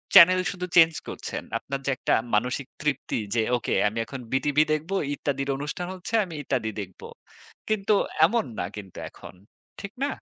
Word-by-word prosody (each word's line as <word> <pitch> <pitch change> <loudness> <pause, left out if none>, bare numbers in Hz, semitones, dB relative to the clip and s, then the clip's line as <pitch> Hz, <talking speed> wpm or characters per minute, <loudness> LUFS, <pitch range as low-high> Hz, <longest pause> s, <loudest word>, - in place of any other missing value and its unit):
Channel 185 0 +9
শুধু 180 -2 -4
change 165 -1 +8
করছেন। - - -5
আপনার 140 0 -4
যে - - 0
১ - - -33
টা - - +5 0.2
মানসিক 125 +4 0
তৃপ্তি 150 -5 -1 0.2
যে, 115 - +3 0.2
ওকে - - -2
আমি 110 +2 -3
এখন 130 +4 -7
বিটিভি 145 +3 +3
দেখব 155 +5 -3 0.2
ইত্যাদির 140 -1 -2
অনুষ্ঠান 150 +5 -4
হচ্ছে 185 +4 -8
আমি 170 -4 -7
ইত্যাদি 125 -5 -1
দেখব। 95 -2 -10 0.7
কিন্তু 210 -1 +2 0.3
এমন 225 +4 +1
না - - 0
কিন্তু 100 -3 -9
এখন। - - -12 0.5
ঠিক 200 - -6
না? 280 - +2
150 Hz, 170 wpm, -26 LUFS, 125-180 Hz, 0.7 s, Channel